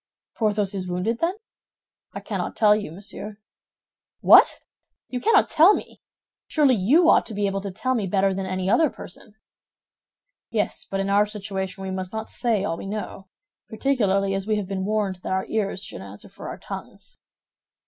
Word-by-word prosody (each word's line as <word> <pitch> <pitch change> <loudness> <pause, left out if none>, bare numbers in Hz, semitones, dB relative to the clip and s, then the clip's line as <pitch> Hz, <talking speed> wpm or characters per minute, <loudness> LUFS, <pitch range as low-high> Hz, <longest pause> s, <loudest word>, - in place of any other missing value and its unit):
"Porthos 210 -3 0
is 185 -2 -4
wounded, 180 +6 -1
then?" 345 +3 0 0.8
"I - - -7
cannot - - -4
tell 210 -1 +5
you, 210 -6 -4
monsieur." 205 +3 -8 0.8
"What! - - +7 0.5
You 250 -1 -4
cannot 455 - +4
tell 335 +7 +6
me? - - -8 0.5
Surely 290 -4 +3
you 260 - +4
ought - - +6
to 220 - -6
be 205 0 0
able 195 0 -1
to 200 - -5
tell 255 +7 -1
me 215 -6 -1
better 195 +1 +2
than 190 0 -3
any 185 0 -2
other 295 +9 +4
person." 205 0 -10 1.1
"Yes; 210 -2 -2
but 195 0 -1
in 195 0 -1
our 205 +1 +4
situation 195 -2 -5
we 190 - -4
must 185 -1 -4
not 220 0 -5
say 225 -5 0
all 165 -4 -2
we - - -7
know—particularly 205 - -2
as 195 +1 -3
we 215 - +2
have 205 -3 -3
been 190 -1 -3
warned 205 -3 -1
that 180 - -4
our 190 0 0
ears 200 -3 -1
should - - -7
answer 100 +1 -11
for - - -10
our - - -6
tongues." - - -9
200 Hz, 180 wpm, -24 LUFS, 190-220 Hz, 1.1 s, What